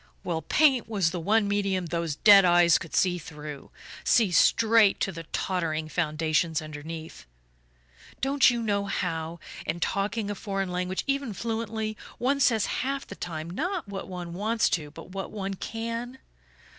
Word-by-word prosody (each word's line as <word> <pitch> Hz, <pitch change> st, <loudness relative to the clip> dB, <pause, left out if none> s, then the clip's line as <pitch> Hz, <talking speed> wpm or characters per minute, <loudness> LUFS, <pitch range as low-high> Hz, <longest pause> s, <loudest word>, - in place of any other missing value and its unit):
Well, 165 Hz, -2 st, -2 dB
paint 265 Hz, -, +3 dB
was 195 Hz, -7 st, +1 dB
the 180 Hz, -, -3 dB
one 210 Hz, +5 st, +2 dB
medium 195 Hz, -2 st, 0 dB
those 170 Hz, -2 st, -2 dB
dead 200 Hz, +3 st, +8 dB
eyes 175 Hz, -1 st, +5 dB
could 165 Hz, -, -7 dB
see 180 Hz, -1 st, +2 dB
through 150 Hz, -3 st, -9 dB, 0.3 s
see 220 Hz, -6 st, +3 dB
straight 220 Hz, +2 st, +5 dB
to 195 Hz, -, +1 dB
the 165 Hz, -2 st, -8 dB
tottering 160 Hz, -3 st, -2 dB
foundations 160 Hz, 0 st, 0 dB
underneath. 155 Hz, -, -8 dB, 0.9 s
Don't 270 Hz, 0 st, +4 dB
you 240 Hz, -1 st, -1 dB
know 200 Hz, -2 st, 0 dB
how, 165 Hz, -3 st, -3 dB, 0.2 s
in 160 Hz, +2 st, -3 dB
talking 205 Hz, +4 st, -1 dB
a -, -, -1 dB
foreign 195 Hz, -2 st, -3 dB
language, 180 Hz, +1 st, -2 dB
even 275 Hz, -4 st, -1 dB
fluently, 220 Hz, 0 st, -3 dB, 0.2 s
one 275 Hz, +3 st, +1 dB
says 230 Hz, -6 st, +3 dB, 0.2 s
half 275 Hz, +1 st, -2 dB
the -, -, -9 dB
time 160 Hz, -2 st, -5 dB
not 340 Hz, -, -2 dB
what 195 Hz, -1 st, -6 dB
one 180 Hz, -2 st, -6 dB
wants 215 Hz, +5 st, +1 dB
to 150 Hz, -4 st, -1 dB
but 165 Hz, +4 st, -12 dB
what 195 Hz, 0 st, -5 dB
one 195 Hz, -2 st, -4 dB
can? 230 Hz, +5 st, -5 dB
195 Hz, 155 wpm, -27 LUFS, 165-225 Hz, 0.9 s, dead